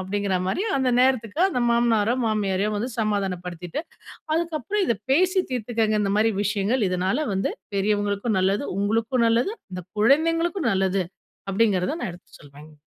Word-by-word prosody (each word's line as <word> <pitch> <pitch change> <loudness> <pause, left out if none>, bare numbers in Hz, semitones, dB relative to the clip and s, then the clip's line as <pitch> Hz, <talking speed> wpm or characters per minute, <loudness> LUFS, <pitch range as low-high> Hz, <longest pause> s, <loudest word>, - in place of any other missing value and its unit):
அப்டிங்கிற 195 0 -1
மாரியும், 390 - -1
அந்த 260 -1 +1
நேரத்துக்கு 255 +1 +1
அந்த 250 -9 -1
மாமனாரோ, 235 -1 +2
மாமியாரையோ 205 -1 0
வந்து 235 +5 -2
சமாதானப்படுத்திட்டு, 180 - -3 0.5
அதுக்கப்புறம் 335 - -1
இத 235 - +2 0.2
பேசி 370 +5 +3
தீர்த்துக்கங்க, 225 -3 0
இந்த 200 -1 0
மாரி 225 +1 +3
விஷயங்கள். 210 +4 0
இதனால 190 +11 0
வந்து, 190 - 0 0.2
பெரியவங்களுக்கும் 205 +1 0
நல்லது. 195 +8 +1
உங்களுக்கும் 225 +4 +1
நல்லது. 240 - +1 0.2
அந்த 180 -1 -6 0.2
குழந்தைங்களுக்கும் 330 - +2
நல்லது. 190 0 +1 0.5
அப்டிங்கிறத 205 - +1
நான் 215 - -2
எடுத்து 175 - -17
சொல்வேங்க. 145 +2 -15
215 Hz, 135 wpm, -24 LUFS, 195-255 Hz, 0.5 s, பேசி